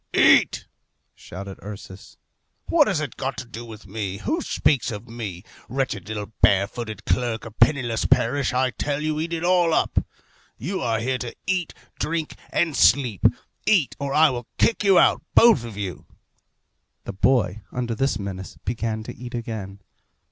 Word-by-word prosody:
"Eat," - - +5 0.5
shouted 95 +2 -9
Ursus. 100 -1 -10 0.5
"What 310 -4 +4
has 190 -7 +1
it 145 -5 -5
got 135 0 -3
to - - -5
do 115 0 -8
with 115 -2 -11
me? 100 -1 -4
Who 310 - -1
speaks 130 - +1
of 110 +1 -6
me? 110 -7 -6 0.3
Wretched 120 -7 -2
little 105 -1 -5
barefooted 105 +2 +1
clerk 120 -2 0
of 115 -1 -11
Penniless 120 -3 +3
Parish, 135 +2 +2
I 130 0 +1
tell 140 +5 -2
you, 155 0 -1
eat 165 +2 -3
it 165 -1 -2
all 175 -2 +3
up! - - +1 0.5
You 185 - -3
are 115 -2 +1
here 130 +2 -1
to 120 - -6
eat, 185 -3 -1 0.2
drink, 160 -1 -2
and 165 -4 +1
sleep 115 +1 +3 0.4
eat, 185 - +3
or 140 0 -3
I 155 +1 +5
will 120 -2 -5
kick 225 - +2
you 195 -2 +5
out, - - +5
both 230 - +7
of 115 -4 -8
you." 95 -6 -5 1.0
The - - -6
boy, 110 -1 +2
under 120 -2 -2
this 135 -1 0
menace, 95 -2 -6
began 110 0 -2
to - - -8
eat 125 0 -8
again. 105 -4 -6
120 Hz, 165 wpm, -24 LUFS, 105-145 Hz, 1.0 s, both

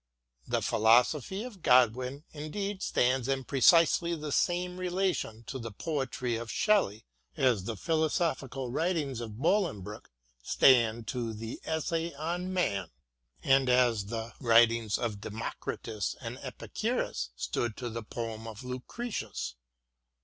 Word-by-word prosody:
The - - 0
philosophy 125 - +3
of 230 -7 -9
Godwin, 125 +3 +3
indeed, 190 +7 -4
stands 125 0 +1
in 135 -1 0
precisely 165 +5 +4
the 150 -2 -5
same 180 +4 0
relation 180 - -1
to 130 +2 -6
the 115 -1 -5
poetry 130 -2 -2
of 115 0 -6
Shelley 190 - +2 0.3
as 120 -8 +2
the 115 -1 -4
philosophical 155 - -1
writings 150 -5 -1
of 110 -2 -7
Bolingbroke 140 - -1 0.3
stand 115 - +4
to 115 -3 -3
the 115 +2 -6
*' - - -16
Essay 160 +1 -1
on 175 +5 -3
Man," 100 - 0 0.5
and 135 -1 +4
as 120 -5 +3
the 115 +1 -5
writings 115 -3 +4
of 110 -4 -3
Democritus 110 -1 -4
and - - -6
Epicurus - - -3
stood 120 -3 -2
to 125 - -4
the 115 0 -4
poem 115 0 -5
of 110 +2 -8
Lucretius. 125 - -5
125 Hz, 130 wpm, -30 LUFS, 115-165 Hz, 0.5 s, precisely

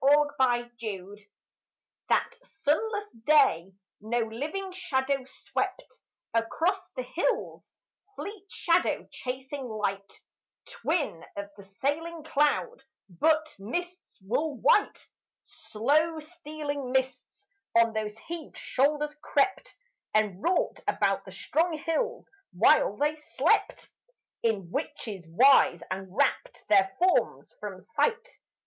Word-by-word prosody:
A 290 +2 +6
MYSTERY 230 -5 -2 0.8
That - - +2
sunless 415 +3 -1 0.2
day 245 - +4 0.3
no 220 +3 -2
living 295 - -4
shadow 270 -5 -1
swept 385 - -4 0.3
Across 325 - +1
the - - -3
hills, - - -2 0.4
fleet 405 -1 -8
shadow 340 +1 +1
chasing 265 +1 -5
light, 200 -2 -3 0.5
Twin 295 - -2
of 200 0 -6
the 200 - -12
sailing 295 +11 -3
cloud: 315 - +1 0.3
but, 310 - +1
mists 350 - -5
wool 275 +8 -1
white, 415 - +2 0.4
Slow 305 +9 0
stealing 300 -4 -5
mists, 260 +9 -2 0.3
on 230 -1 +5
those 215 -1 -3
heaved 330 +4 -8
shoulders 295 +2 +1
crept, 385 - 0 0.4
And 210 -3 +2
wrought 360 +1 +1
about - - +1
the - - -10
strong 330 +2 0
hills 330 +10 -1 0.3
while - - +4
they 300 +1 +1
slept 300 - +1 0.5
In 200 -7 0
witches' 190 -6 -4
wise, 190 - +5
and 190 0 -3
rapt 280 -1 0
their 195 -2 +5
forms 365 +1 +1
from - - -6
sight. 475 +1 -1
285 Hz, 105 wpm, -28 LUFS, 220-335 Hz, 0.8 s, A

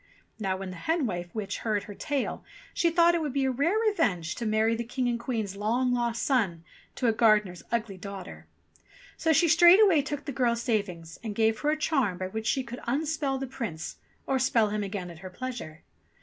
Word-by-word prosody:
Now 190 -3 -1
when 190 -1 -6
the 180 - -8
hen 320 - 0
wife 175 -5 -3
witch 200 -3 -3
heard 215 -3 -1
her 205 - -9
tale, 280 +5 -3 0.3
she 340 - +2
thought 340 +1 +5
it 340 - +1
would 295 -4 -2
be 275 -1 +1
a 265 - +2
rare 305 - +1
revenge 200 - +1
to 235 - -4
marry 220 +1 +2
the 235 - -3
King 245 +2 -2
and 240 -1 0
Queen's 225 -5 -3
long 240 +5 +1
lost 235 -1 -1
son 200 - +1 0.3
to 255 - -2
a 230 - +5
gardener's 210 -5 +3
ugly 220 -4 -1
daughter; 195 -1 -9 0.7
so 320 - +1
she 335 +3 +4
straight 350 +6 +8
way 325 -6 +4
took 290 +1 -5
the 285 - -3
girl's 235 -2 0
savings 180 -8 -2
and 215 -3 -4
gave 220 0 +2
her 295 - 0
a 310 - +1
charm 270 - +1
by 185 +1 -4
which 220 +3 -4
she 265 - +1
could 245 0 -8
unspell 290 0 -1
the 270 - -3
Prince 220 -11 -5 0.3
or 265 -1 +1
spell 235 -4 +3
him 210 0 -2
again 195 -3 -5
at 165 - -12
her 185 +1 -8
pleasure. 230 -8 -7
235 Hz, 215 wpm, -28 LUFS, 200-270 Hz, 0.7 s, straight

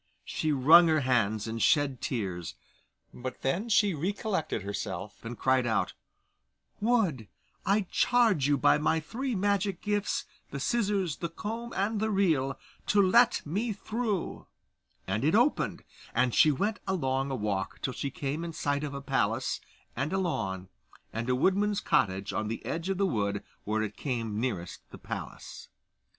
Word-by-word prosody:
She 155 - -1
wrung 155 +5 +7
her 155 -2 +3
hands 115 -5 +1
and 115 0 -3
shed 140 -2 +3
tears, 90 - -3 0.6
but 125 0 -7
then 180 - 0
she 205 -3 +4
recollected 185 - -2
herself, 100 -1 -5
and 115 +1 -6
cried 130 -2 +2
out, 110 - 0 0.9
'Wood, 205 - +1 0.4
I 200 +2 +4
charge 205 - +3
you 145 -1 +3
by 135 - +4
my 160 +2 +2
three 240 - -3
magic 200 -1 +1
gifts, 205 -1 -1 0.2
the 140 - -5
scissors, 195 - 0
the 170 - -3
comb, 225 +7 -5
and 205 +3 0
the 220 +1 0
reel 160 -10 +1 0.3
to 205 - +3
let 230 +5 +5
me 210 +9 -1
through'; 215 -1 -3 0.6
and 100 +5 -1
it 155 +6 +3
opened, 245 +6 +2 0.3
and 125 0 +2
she 155 - +6
went 205 +10 -1
along 135 -7 0
a 135 - -1
walk 100 -4 -2
till 130 - -1
she 140 - -3
came 140 +4 -3
in 170 -1 -5
sight 145 -2 -1
of 145 -2 -4
a 140 - -5
palace, - - 0 0.3
and 140 +3 -1
a 195 - +1
lawn, 95 - -2 0.5
and 115 +3 -3
a 125 - +3
woodman's 200 +8 +2
cottage 95 0 +1
on 105 - -1
the 115 - -5
edge 165 +3 -3
of 195 - 0
the 200 - +2
wood 100 - -1 0.2
where 110 +1 0
it 105 -1 -5
came 115 -6 -2
nearest 95 -9 -3
the - - -10
palace. - - -7
150 Hz, 165 wpm, -29 LUFS, 120-200 Hz, 0.9 s, wrung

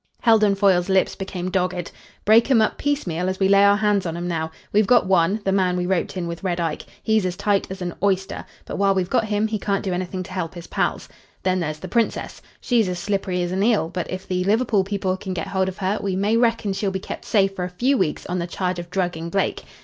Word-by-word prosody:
Heldon 215 -3 +4
Foyle's 195 -2 +3
lips 190 -1 +2
became 185 -2 -4
dogged. 180 -2 -1 0.3
"Break 225 +4 +5
'em 255 -4 +5
up 220 - +1
piecemeal 185 - -1
as 185 - -3
we 190 - +3
lay 200 0 +5
our 200 0 +5
hands 205 -3 +1
on 165 0 -4
'em 175 +1 -3
now. 160 -2 -2 0.2
We've 210 -1 +4
got 245 -1 +5
one 185 +2 +3
the 195 - +2
man 185 -2 +2
we 180 - -1
roped 185 +1 -1
in 180 - -2
with 170 +2 -6
Red 180 -2 -1
Ike. 165 -3 -3 0.2
He's 220 -2 +2
as 180 -1 -2
tight 200 0 +1
as 190 0 -6
an 175 -1 -3
oyster; 190 -1 0 0.2
but - - -5
while 195 -1 +3
we've 185 -1 -1
got 235 -3 +2
him 210 0 0
he 220 -1 -2
can't 200 0 -1
do 190 - -1
anything 185 +1 -3
to 185 - -12
help 185 -2 -4
his 175 -1 -8
pals. - - -1 0.4
Then 185 0 +1
there's 155 -3 -2
the - - -8
Princess. 235 -2 -1 0.2
She's 230 -6 +2
as 180 - -3
slippery 185 -1 -1
as 175 - -3
an 190 +1 -1
eel; 210 -6 +2
but 180 0 -4
if 185 0 -6
the 180 -1 0
Liverpool 215 0 +2
people 190 -1 -1
can 190 -1 -5
get 165 - -3
hold 190 -1 0
of 190 - -9
her 195 +2 -1
we 195 -2 -1
may 205 +4 +1
reckon 230 -3 +2
she'll 195 +1 -1
be 190 - -2
kept 190 - -7
safe 195 -2 +2
for 180 - -3
a 180 - -3
few 245 +10 +1
weeks 185 - -1
on 180 +1 -2
the 170 - -2
charge 180 0 -2
of 175 0 -7
drugging 175 -3 -2
Blake. 195 +2 -1
190 Hz, 255 wpm, -22 LUFS, 180-205 Hz, 0.4 s, Break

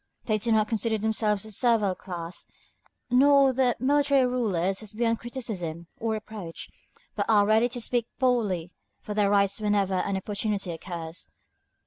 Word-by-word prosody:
They 215 -2 +1
do 230 +3 -1
not 215 -1 +3
consider 225 0 0
themselves 215 -1 0
as 215 - -6
a - - -3
servile 225 -6 +2
class, 175 -2 -7 0.6
nor 275 +1 +5
their 250 -2 +2
military 280 +1 +3
rulers 195 -7 0
as 215 -1 -5
beyond 230 0 0
criticism 195 -10 -5
or 225 -1 -2
reproach, 215 -6 -7 0.5
but - - -1
are 210 -2 +5
ready 220 +3 +3
to 245 0 -5
speak 235 0 -1
boldly 215 -10 0 0.3
for 210 - -5
their 205 -1 +2
rights 200 0 +2
whenever 205 -2 +1
an 190 +1 0
opportunity 200 -1 -2
occurs. 165 -1 -6
215 Hz, 155 wpm, -27 LUFS, 195-240 Hz, 0.6 s, nor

